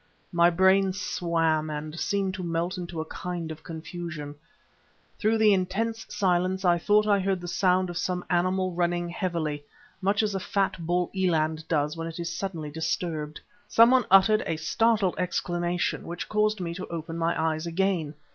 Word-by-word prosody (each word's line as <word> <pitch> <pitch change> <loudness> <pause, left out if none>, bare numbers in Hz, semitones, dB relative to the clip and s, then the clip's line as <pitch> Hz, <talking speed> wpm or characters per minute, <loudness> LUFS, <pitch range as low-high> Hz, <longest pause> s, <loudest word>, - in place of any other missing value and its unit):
My 170 -1 +5
brain 190 +2 +4
swam 165 -4 0
and 155 +2 -5
seemed 195 -2 0
to 185 - -5
melt 170 +2 -1
into 175 -3 -6
a - - -5
kind 170 0 -5
of 160 - -8
confusion. 160 -2 -7 0.9
Through 220 +1 +2
the 215 -2 +5
intense 220 +5 -1
silence 185 0 0
I 175 -1 +4
thought 210 +4 +3
I 205 -1 +3
heard 190 -1 0
the 175 - -7
sound 185 +1 +2
of 175 0 -4
some 180 0 -2
animal 185 +1 +1
running 175 0 0
heavily, 170 -6 -2 0.4
much 200 +3 +2
as 210 -1 0
a 195 - -1
fat 195 +1 0
bull 175 0 0
eland 160 -4 0
does 150 -1 0
when 165 0 -4
it 165 - -7
is 170 -1 -3
suddenly 165 -6 -4
disturbed. 155 -1 -3 0.3
Someone 245 +2 +5
uttered 195 +3 +6
a 165 - 0
startled 210 +3 +2
exclamation, 175 -1 -1
which 170 +1 -5
caused 215 0 +1
me 170 -1 -3
to 180 - -6
open 165 -1 -5
my 165 0 0
eyes 160 0 -1
again. 170 -3 0
175 Hz, 170 wpm, -27 LUFS, 165-190 Hz, 0.9 s, uttered